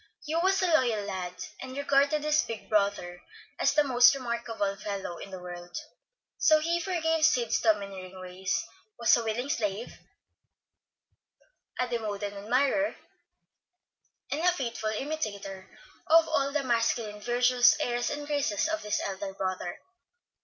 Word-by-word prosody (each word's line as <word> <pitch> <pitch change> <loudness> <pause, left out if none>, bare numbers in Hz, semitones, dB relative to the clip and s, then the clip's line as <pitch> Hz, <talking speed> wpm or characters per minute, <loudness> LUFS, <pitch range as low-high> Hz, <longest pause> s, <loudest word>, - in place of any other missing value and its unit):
Hugh 315 +2 0
was 380 +3 +3
a 350 -3 +2
loyal 235 -8 +2
lad, 185 -3 -4 0.3
and 260 +1 -7
regarded 285 +1 +2
his 305 0 +3
big 225 -2 -7
brother 200 -4 0 0.4
as - - +2
the 300 - +5
most 250 -1 +6
remarkable 235 -5 -2
fellow 195 -4 -5
in - - -8
the 190 - -7
world; 175 +3 -8 0.6
so 310 -1 +5
he 335 +2 0
forgave 325 -3 0
Sid's 245 -7 +3
domineering 195 -4 -1
ways, 185 +1 -3 0.3
was 235 - +5
a 235 - -1
willing 225 +4 -2
slave, 210 -3 -2 1.8
a 250 - +1
devoted 210 -4 -3
admirer, 260 +9 +1 1.4
and 295 - -1
a 360 +1 +4
faithful 235 -9 -3
imitator 210 -7 -4 0.4
of 330 +1 +6
all 280 -3 +1
the 295 -1 0
masculine 230 -3 0
virtues, 245 +2 +4
airs, 240 0 0
and 290 0 -4
graces 285 -7 0
of 320 -1 -2
this 210 0 -1
elder 195 0 -5
brother. 185 -2 -3
235 Hz, 140 wpm, -29 LUFS, 200-290 Hz, 1.8 s, most